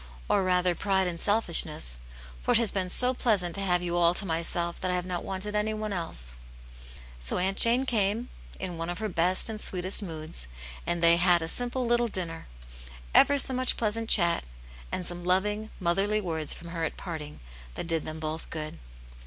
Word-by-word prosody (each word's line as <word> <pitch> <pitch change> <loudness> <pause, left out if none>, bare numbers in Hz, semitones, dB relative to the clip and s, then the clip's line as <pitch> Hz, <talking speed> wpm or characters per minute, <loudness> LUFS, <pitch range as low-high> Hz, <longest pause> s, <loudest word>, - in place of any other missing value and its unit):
Or - - +2
rather, 180 -1 +1
pride 190 +1 0
and 170 -1 -4
selfishness, 160 - +2 0.4
for - - +1
it - - +5
has 230 -3 +1
been 185 -2 -2
so 250 +7 +8
pleasant 200 -9 0
to 200 - -1
have 180 -2 +1
you 175 0 -2
all 175 0 +3
to 200 - -2
myself 170 0 -1
that 185 - -1
I 180 - 0
have 180 0 -2
not 180 -1 -4
wanted 195 +2 -4
anyone 215 0 -2
else." - - -2 0.9
So - - -2
Aunt 190 +2 -1
Jane 240 +3 +4
camei, 220 -1 0 0.3
in 180 -3 -5
one 165 +1 -3
of 175 - -3
her 215 0 -3
best 180 +1 +1
and 215 -1 -2
sweetest 185 +3 +3
moods, 155 - -4 0.4
and 170 -1 -1
they 170 0 +6
had 175 -1 +4
a - - -4
simple 245 +6 -1
little 240 0 +2
dinner, 175 -6 -5 0.7
ever 285 - +5
so 265 -1 +4
much 255 0 +1
pleasant 225 0 -2
chat, 170 -4 +3 0.5
and 180 - -3
some 175 0 -4
loving, 210 +4 0
motherly 195 +4 +1
words 160 -6 -3
from 170 - -7
her 170 -1 -4
at 160 - -3
parting, 155 -5 -7 0.4
that - - -5
did 165 -2 0
them 155 0 -7
both 155 +1 -5
good. 155 - -6
180 Hz, 195 wpm, -27 LUFS, 170-210 Hz, 0.9 s, so